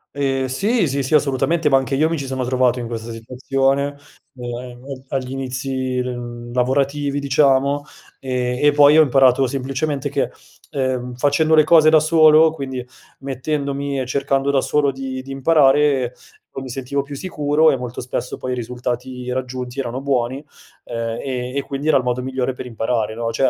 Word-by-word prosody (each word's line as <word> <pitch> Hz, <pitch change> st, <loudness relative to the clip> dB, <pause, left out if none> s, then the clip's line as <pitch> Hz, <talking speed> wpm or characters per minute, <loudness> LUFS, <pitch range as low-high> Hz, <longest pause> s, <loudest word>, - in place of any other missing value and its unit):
Ehm, 135 Hz, -2 st, 0 dB
sì, 195 Hz, -, +1 dB
sì 140 Hz, +1 st, -1 dB
sì, 135 Hz, +3 st, +1 dB
assolutamente. 150 Hz, +3 st, +2 dB
Ma 135 Hz, -, +5 dB
anche 135 Hz, +1 st, -1 dB
io 155 Hz, +4 st, +3 dB
mi 165 Hz, -1 st, -2 dB
ci 140 Hz, -, -5 dB
sono 130 Hz, -1 st, -2 dB
trovato 125 Hz, -1 st, +2 dB
in 120 Hz, -, -4 dB
questa 115 Hz, 0 st, -6 dB
situazione, 135 Hz, +4 st, -1 dB, 0.4 s
ehm, 125 Hz, +2 st, -7 dB
a -, -, -5 dB
agli 130 Hz, -1 st, -3 dB
inizi, 130 Hz, 0 st, -3 dB
ehm, 120 Hz, -1 st, -5 dB
lavorativi, 140 Hz, +3 st, 0 dB
diciamo, 140 Hz, 0 st, +2 dB, 0.4 s
e 125 Hz, -1 st, -2 dB
e 145 Hz, -, +5 dB
poi 145 Hz, 0 st, +6 dB
ho -, -, +9 dB
imparato 135 Hz, -2 st, +4 dB
semplicemente 135 Hz, +2 st, -2 dB
che, -, -, -1 dB, 0.4 s
ehm, 130 Hz, -2 st, -2 dB
facendo 145 Hz, +5 st, +2 dB
le 155 Hz, -, +6 dB
cose 155 Hz, 0 st, +6 dB
da 155 Hz, 0 st, +6 dB
solo, 155 Hz, 0 st, +5 dB
quindi 130 Hz, -5 st, -5 dB, 0.4 s
mettendomi 140 Hz, +1 st, -3 dB
e 130 Hz, -, -3 dB
cercando 135 Hz, +1 st, 0 dB
da 135 Hz, -2 st, +2 dB
solo 145 Hz, -2 st, +1 dB
di 130 Hz, -1 st, -6 dB
di 135 Hz, -, -9 dB
imparare, 135 Hz, -2 st, +3 dB, 0.5 s
mi 130 Hz, -, -7 dB
sentivo 135 Hz, +2 st, -2 dB
più 140 Hz, +1 st, -8 dB
sicuro 150 Hz, -1 st, +2 dB
e -, -, 0 dB
molto 125 Hz, -1 st, -6 dB
spesso 125 Hz, 0 st, -4 dB
poi 130 Hz, -, -4 dB
i 125 Hz, -, -1 dB
risultati 125 Hz, +1 st, -4 dB
raggiunti 125 Hz, 0 st, -4 dB
erano 125 Hz, 0 st, -3 dB
buoni, 135 Hz, 0 st, -1 dB, 0.4 s
ehm, 115 Hz, -1 st, -4 dB
e 125 Hz, -1 st, -4 dB
e 140 Hz, -, -1 dB
quindi 140 Hz, +3 st, -5 dB
era 155 Hz, -, +5 dB
il 130 Hz, -, -1 dB
modo 125 Hz, 0 st, -1 dB
migliore 130 Hz, 0 st, -2 dB
per 125 Hz, -, -8 dB
imparare 115 Hz, -2 st, -2 dB
no; 115 Hz, 0 st, -2 dB
cioè, 130 Hz, +3 st, +2 dB
135 Hz, 175 wpm, -20 LUFS, 125-140 Hz, 0.5 s, ho